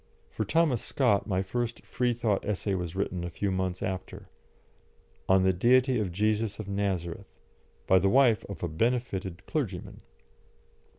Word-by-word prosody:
For 110 - -2
Thomas 145 0 +2
Scott 120 -8 +1
my 95 -2 0
first 120 +4 -3
Freethought 120 -4 0
essay 105 -1 -1
was 90 -2 -3
written 95 -2 -2
a 85 - -3
few 95 +4 -2
months 95 -1 -2
after, 95 0 -5 1.0
"On 95 0 +5
the 95 0 +3
Deity 125 +6 +3
of 100 -4 -1
Jesus 105 +2 0
of 110 - -6
Nazareth," 95 -2 -3 0.5
by 95 - +5
the 95 - +2
wife 125 -2 +4
of 100 - -8
a - - +1
benefited 95 -1 -2
clergyman. 105 - -4
100 Hz, 145 wpm, -28 LUFS, 95-115 Hz, 1.0 s, On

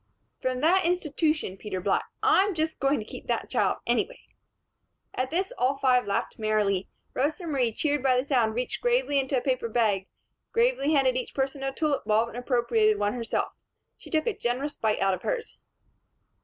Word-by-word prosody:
"From 255 0 -1
that 365 +5 +4
institution. 310 - 0
Peter 190 -2 -4
Black! 195 +2 +1 0.2
I'm 415 -2 +4
just 315 0 -1
going 275 +2 +2
to 215 - -5
keep - - -10
that - - -2
child, - - +2
anyway." - - 0 0.9
At 255 +1 -1
this, 375 - -1
all 265 +2 +2
five 250 -3 +3
laughed 200 - -2
merrily. 210 -3 +1 0.2
Rosa 310 +7 -1
Marie, 265 -7 +1
cheered 290 +4 0
by 255 -1 +3
the 250 - +2
sound, 240 -6 +1
reached 250 +1 -3
gravely 485 - +2
into 270 0 0
a - - 0
paper 255 -3 -1
bag, 210 -4 +1 0.5
gravely 465 - +2
handed 265 -3 +3
each 255 - -5
person 270 0 -1
a 270 0 -1
tulip 295 0 -1
bulb 220 +2 +2
and 235 - -9
appropriated 235 -4 +2
one 205 0 0
herself. 235 -2 -2 0.4
She - - -14
took 315 -3 +1
a 465 - +1
generous 265 +5 -2
bite 220 -2 0
out 195 0 +3
of 185 - -4
hers. - - -3
260 Hz, 185 wpm, -27 LUFS, 225-310 Hz, 0.9 s, that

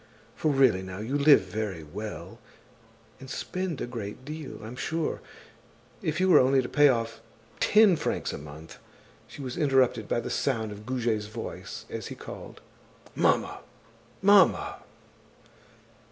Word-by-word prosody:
For 155 - 0
really 130 -9 +4
now, 95 0 -7
you 110 +7 -3
live 145 0 +7
very 95 -2 -4
well; 105 +8 -7 0.8
and 135 - -11
spend 180 +1 -3
a - - -1
great 120 0 -7
deal, 150 -7 -7
I'm 115 +3 -7
sure. 160 +4 -2 0.8
If 155 +1 -1
you 185 - +3
were 185 - +7
only 135 +1 +4
to - - -4
pay 145 +1 +5
off 115 -2 -1 0.4
ten 210 -3 +6
francs - - -2
a - - -5
month—" 75 +2 -11 0.5
She 140 - -9
was 130 +4 -5
interrupted 130 -7 +2
by - - 0
the 115 - -5
sound 115 -6 -1
of 105 +2 -10
Goujet's 115 -5 -1
voice 110 +2 -7
as - - -6
he - - -7
called: - - -10 0.5
"Mamma! - - +1 0.6
Mamma!" 200 -1 +5
125 Hz, 145 wpm, -28 LUFS, 105-145 Hz, 0.8 s, live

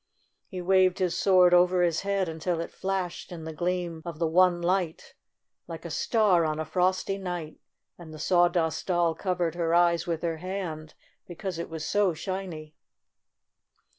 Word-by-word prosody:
He 185 -3 -6
waved 185 0 +3
his 180 -2 0
sword 180 -2 +5
over 180 0 +4
his 170 -2 +1
head 195 -1 0
until 165 +1 -2
it 165 - -5
flashed 190 -3 -4
in 170 -2 -7
the 160 0 -6
gleam 175 -1 -2
of 170 -2 -7
the 165 - 0
one 175 +2 +4
light 175 -1 -1 0.5
like - - -8
a - - -5
star 205 -7 +2
on 155 -1 -1
a 160 - -2
frosty 185 +4 0
night, 175 -4 -5 0.4
and 165 -2 -11
the 155 - -9
Sawdust, 175 -1 +1
Doll 175 -2 +2
covered 180 -1 -1
her 170 -1 0
eyes 170 0 +3
with 165 -1 -2
her 165 -1 -1
hand, 165 -3 -5 0.3
because 180 0 -5
it 170 - -5
was 160 -1 -5
so 200 -4 +1
shiny. 170 -3 -6
175 Hz, 165 wpm, -27 LUFS, 165-185 Hz, 0.5 s, sword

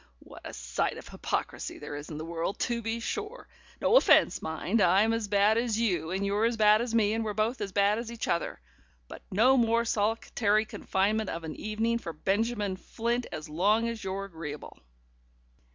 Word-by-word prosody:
What - - -14
a - - -7
sight 60 +1 -2
of - - -10
hypocrisy - - -3
there 145 - -7
is 145 +1 -7
in 155 - -6
the 155 - -5
world, 170 +4 -3
to 235 -1 0
be 225 +1 -2
sure! 425 - -5 0.3
No 475 - +5
offence - - +5
mind: 175 +7 -1
I'm 200 +6 +4
as 225 -2 -1
bad 205 +2 +3
as 230 -2 -1
you, 175 -8 0
and 190 +2 -1
you're 205 +3 +1
as 230 0 0
bad 215 0 +5
as 235 -1 -2
me, 215 -2 +3
and 225 0 -1
we're 210 -2 -3
both 220 +3 0
as 200 -1 -3
bad 200 +2 +2
as 235 0 -6
each 235 - -4
other. 170 - -1 0.5
But - - -10
no 250 +7 +4
more 235 -1 +2
solitary 215 0 +1
confinement 210 +1 -1
of 165 0 -5
an 160 -1 -6
evening 225 +2 -1
for 170 -7 -6
Benjamin 205 +3 -1
Flint, 235 +4 -2
as 155 -2 -6
long 205 +9 +2
as 230 -2 -5
you're 195 +1 -3
agreeable." 160 -5 -8
210 Hz, 195 wpm, -29 LUFS, 190-230 Hz, 0.5 s, No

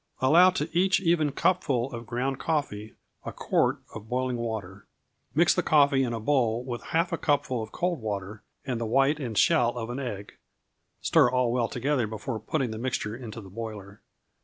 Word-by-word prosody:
Allow 165 +8 +6
to 175 -4 -2
each 185 +2 +3
even 165 -5 +2
cupful 135 -6 0
of 115 -1 -7
ground 130 +3 -2
coffee 110 -10 -2 0.3
a - - -5
quart - - 0
of 110 0 -9
boiling 125 0 -1
water. 105 -5 -5 0.5
Mix - - +5
the - - +1
coffee 140 -3 +4
in 125 - -1
a 115 - -3
bowl 120 -2 +1
with 120 -2 -5
half 170 +1 0
a - - -1
cupful 145 -5 0
of 110 0 -7
cold 175 -5 -2
water 105 -1 -4 0.2
and 125 -3 -3
the 115 - -1
white 135 +6 +2
and 120 -7 -4
shell 120 - +3
of 115 0 -4
an 125 - -4
egg; 105 -7 -6 0.6
stir - - +4
all 125 -2 +1
well 120 -2 +1
together 125 -1 -1
before 110 +2 -5
putting 125 +2 -2
the 110 - -6
mixture 115 -3 -2
into 115 -2 -8
the 95 - -12
boiler. 105 -2 -8
125 Hz, 185 wpm, -27 LUFS, 110-140 Hz, 0.6 s, Allow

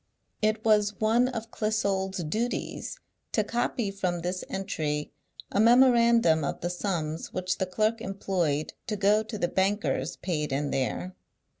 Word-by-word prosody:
"It 215 +1 +1
was 210 -2 +3
one 230 +3 +3
of 230 -3 -5
Clissold's 195 -4 -1
duties 230 - -3 0.4
to 215 - +3
copy 235 -1 -1
from 180 -3 -2
this 180 +2 -3
entry 155 -6 -2 0.4
a - - 0
memorandum 235 - +5
of 140 - -3
the 175 - -1
sums 170 -4 -3
which 185 0 -2
the 190 - 0
clerk 215 +5 0
employed 180 -7 -1
to 215 - -1
go 205 +1 +3
to 220 0 -6
the 175 - +1
bankers' 180 -6 0
paid 150 -6 -2
in 140 +1 -1
there. 135 +7 -2
195 Hz, 145 wpm, -28 LUFS, 175-220 Hz, 0.4 s, memorandum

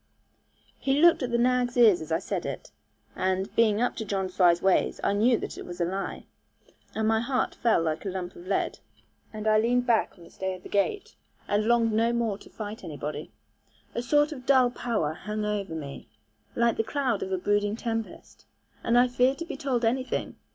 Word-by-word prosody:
He 275 +1 +1
looked 340 0 +6
at 250 - -1
the 235 - +1
nag's 245 0 +1
ears 215 -8 +6
as 155 - -7
he 160 0 +1
said 190 - -3
it; - - -6 0.4
and, 190 +2 -1
being 220 -2 +3
up 245 - 0
to 220 - -2
John 195 -2 -2
Fry's 180 -2 +4
ways, 190 0 +2
I - - +2
knew 230 +4 +3
that - - -6
it - - -6
was 175 0 -8
a 170 - +2
lie. 190 +3 -4 0.7
And 220 0 0
my 220 0 +3
heart 255 +2 -1
fell 225 -8 +2
like 160 -1 -2
a 200 - -3
lump 180 -1 -5
of 175 - -12
lead, 195 - -1 0.5
and 215 0 -5
I 215 0 +5
leaned 245 +2 +2
back 235 -3 +2
on 175 - -15
the - - -15
stay 190 -1 -3
of 180 - -14
the - - -10
gate, 205 - -1 0.3
and 205 +1 +1
longed 230 -1 +3
no 230 +2 +2
more 230 -4 -1
to - - -15
fight 215 0 -7
anybody. 150 -1 -6 0.6
A 235 - -2
sort 295 +5 +2
of 260 -4 -9
dull 255 -3 +5
power 220 -12 -1
hung 210 +5 -4
over 200 -5 -2
me, 140 -3 -8 0.5
like 235 -1 +2
the 225 - +2
cloud 250 -2 -1
of 190 - -4
a 190 - +1
brooding 205 +2 +1
tempest, 225 -1 -5 0.4
and 235 - +3
I 245 +1 +6
feared 250 +2 +2
to 335 - -5
be 340 - -6
told 260 -4 -1
anything. 255 +3 -1
220 Hz, 210 wpm, -27 LUFS, 190-245 Hz, 0.7 s, looked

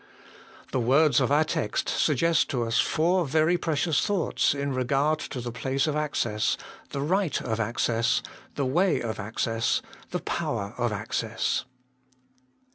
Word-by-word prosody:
The 130 - 0
words 135 +4 +4
of 130 - +1
our 150 +2 +5
text 155 -8 -2
suggest 160 +2 +2
to 125 -3 0
us 115 -1 +1
four 175 +3 +2
very 155 +3 +2
precious 165 -2 +1
thoughts 195 -7 +1
in 140 -1 -2
regard 140 +4 +1
to 135 - -5
the 120 0 -4
place 130 +3 -1
of 155 -2 -1
access, 120 -8 0 0.3
the 140 - -3
right 180 +2 +1
of 110 -1 -3
access, 115 +1 +1 0.3
the 140 - 0
way 170 +7 +2
of 110 -2 -4
access, 115 +2 0 0.3
the - - -2
power 100 +1 -3
of 120 -1 +1
access. 110 +2 -2
135 Hz, 145 wpm, -26 LUFS, 115-155 Hz, 0.3 s, our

